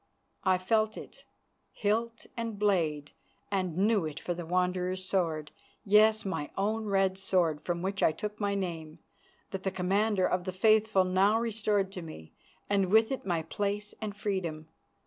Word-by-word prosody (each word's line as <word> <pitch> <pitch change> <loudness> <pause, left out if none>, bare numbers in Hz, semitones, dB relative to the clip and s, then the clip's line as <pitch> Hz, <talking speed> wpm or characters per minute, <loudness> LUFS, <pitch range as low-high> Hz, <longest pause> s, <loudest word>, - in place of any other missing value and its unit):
I 190 -2 +3
felt 215 +4 +1
it, - - -11 0.5
hilt 230 +2 -1
and 230 -3 -4
blade, 165 -8 +1 0.4
and 185 -4 -1
knew 205 0 +3
it 150 -1 -6
for 175 - -3
the 170 -1 -7
Wanderer's 180 +1 0
sword, 165 -5 -1 0.3
yes, 215 +1 +5
my 185 -6 -3
own 215 +3 0
red 195 -2 +1
sword 175 -6 +1
from 175 0 -3
which 195 +1 -2
I - - +5
took 210 +5 -6
my 200 -1 0
name, 165 -5 -4 0.5
that 195 - -4
the 190 - -1
Commander 190 +2 +1
of 180 -1 0
the 185 - -2
Faithful 215 0 +4
now 190 +4 +3
restored 210 -4 0
to 185 - -6
me, 120 - -10 0.3
and 200 -2 +2
with 220 +4 +4
it 265 -7 -4
my 170 -3 0
place 205 +3 -3
and 210 -2 -5
freedom. 170 -7 -3
195 Hz, 165 wpm, -30 LUFS, 180-210 Hz, 0.5 s, yes